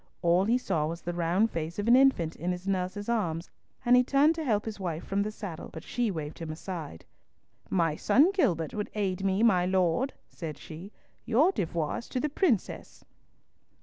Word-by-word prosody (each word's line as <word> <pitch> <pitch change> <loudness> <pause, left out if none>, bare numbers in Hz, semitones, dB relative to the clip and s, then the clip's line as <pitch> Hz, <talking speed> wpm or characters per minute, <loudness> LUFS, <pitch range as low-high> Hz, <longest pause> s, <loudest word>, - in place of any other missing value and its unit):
All 175 +2 +4
he 235 +4 +3
saw 170 -11 -1
was 170 +2 -6
the 175 - -3
round 175 +6 +1
face 165 +1 -4
of 205 +1 -2
an 240 - +7
infant 255 -12 +3
in 180 +2 -2
its 180 +1 -8
nurse's 195 +1 -2
arms, 175 -8 -1 0.3
and 245 +1 +6
he 250 - +6
turned 280 +5 +4
to 325 -1 -4
help 215 -7 0
his 220 -2 -6
wife 170 -4 -3
from 195 +1 0
the 210 - -1
saddle, 200 -6 -7
but 160 - -9
she 240 -2 -1
waved 155 -5 -5
him 165 -2 -6
aside. 155 - -7 0.6
"My 165 -5 +1
son 295 - +4
Gilbert 190 - 0
will 210 -1 -2
aid 195 -3 -1
me, 195 +2 +1
my 180 -6 +4
Lord," 185 +7 +1
said 160 -3 -7
she, 170 +6 -10 0.3
"your 265 +11 +3
devoir 165 - -2
is 235 - -12
to 255 - -2
the 300 - -1
princess." 285 - -1
190 Hz, 195 wpm, -29 LUFS, 170-235 Hz, 0.6 s, an